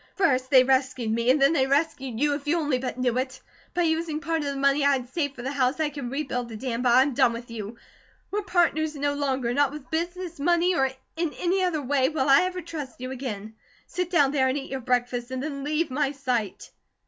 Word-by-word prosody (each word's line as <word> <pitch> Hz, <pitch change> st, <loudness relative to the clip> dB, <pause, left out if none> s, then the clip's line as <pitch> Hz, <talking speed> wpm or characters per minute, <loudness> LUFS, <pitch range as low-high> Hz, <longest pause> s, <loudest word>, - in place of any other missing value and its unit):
First 260 Hz, -9 st, +2 dB
they 260 Hz, -3 st, +7 dB
rescued 260 Hz, -3 st, +1 dB
me; 230 Hz, +2 st, +1 dB
and 270 Hz, +3 st, +5 dB
then 275 Hz, +3 st, +5 dB
they 265 Hz, -4 st, +2 dB
rescued 275 Hz, -4 st, 0 dB
YOU, 295 Hz, +1 st, +2 dB
if 285 Hz, 0 st, -5 dB
you 330 Hz, +4 st, +2 dB
only 295 Hz, -6 st, 0 dB
but 255 Hz, -1 st, -4 dB
knew 250 Hz, -1 st, +1 dB
it. 260 Hz, 0 st, -4 dB, 0.4 s
By 350 Hz, -, +2 dB
using 320 Hz, -1 st, 0 dB
part 325 Hz, +2 st, -1 dB
of 295 Hz, -, -3 dB
the 280 Hz, -, -2 dB
money 275 Hz, +1 st, +2 dB
I 280 Hz, 0 st, +5 dB
had 255 Hz, -2 st, -3 dB
saved 285 Hz, -5 st, -1 dB
for 240 Hz, -, -8 dB
the 265 Hz, -, -2 dB
house, 265 Hz, +1 st, 0 dB
I 310 Hz, -1 st, +1 dB
can 280 Hz, -4 st, -5 dB
rebuild 250 Hz, -3 st, -3 dB
the 225 Hz, -, -7 dB
dam; 240 Hz, 0 st, -3 dB
but 250 Hz, -1 st, +3 dB
I 260 Hz, -, +7 dB
am 280 Hz, 0 st, -2 dB
done 235 Hz, 0 st, +3 dB
with 235 Hz, 0 st, -8 dB
you. 220 Hz, 0 st, -6 dB, 0.5 s
We're 415 Hz, +2 st, 0 dB
partners 340 Hz, -5 st, +1 dB
no 285 Hz, 0 st, 0 dB
longer. 265 Hz, -4 st, -1 dB
Not 285 Hz, 0 st, +2 dB
with 290 Hz, -4 st, -10 dB
business, 345 Hz, 0 st, -3 dB
money, 345 Hz, +4 st, +3 dB
or 270 Hz, -5 st, +2 dB, 0.3 s
in 335 Hz, -2 st, -1 dB
any 370 Hz, +2 st, +1 dB
other 325 Hz, -5 st, 0 dB
way, 265 Hz, 0 st, +2 dB
will 285 Hz, -3 st, 0 dB
I 275 Hz, -, +7 dB
ever 365 Hz, 0 st, -3 dB
trust 300 Hz, -7 st, -7 dB
you 255 Hz, +1 st, -5 dB
again. 220 Hz, -5 st, -5 dB, 0.3 s
Sit 360 Hz, -1 st, -3 dB
down 290 Hz, -7 st, +3 dB
there 265 Hz, -3 st, +2 dB
and 260 Hz, +2 st, 0 dB
eat 275 Hz, -, -6 dB
your 265 Hz, -, -2 dB
breakfast, 245 Hz, 0 st, -1 dB
and 260 Hz, 0 st, -4 dB
then 280 Hz, -2 st, -4 dB
leave 305 Hz, +1 st, -1 dB
my 280 Hz, +1 st, 0 dB
sight." 250 Hz, -7 st, -3 dB
275 Hz, 240 wpm, -26 LUFS, 255-310 Hz, 0.5 s, they